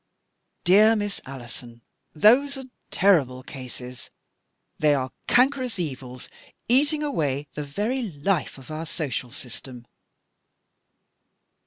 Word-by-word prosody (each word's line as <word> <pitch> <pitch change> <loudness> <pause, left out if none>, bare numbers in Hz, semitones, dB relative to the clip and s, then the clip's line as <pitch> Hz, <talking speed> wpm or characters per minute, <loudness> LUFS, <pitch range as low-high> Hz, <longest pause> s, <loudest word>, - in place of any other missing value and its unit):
" - - -50
Dear 215 +3 +7
Miss 205 -2 -2
Alison, 120 -3 -9 0.3
those 270 - +5
are 265 - -6 0.3
terrible 140 -10 +3
cases. 125 -1 -8 0.7
They 150 -1 +4
are 130 -1 -2 0.2
cankerous 255 -2 +3
evils, 130 -6 -5 0.4
eating 290 +5 +3
away 145 - -1
the 150 - -4
very 210 - -2
He 160 - -7 0.3
of 135 +3 -12
our 160 +1 -4
social 140 -6 -3
system." 125 -1 -8
150 Hz, 110 wpm, -25 LUFS, -, 0.7 s, Dear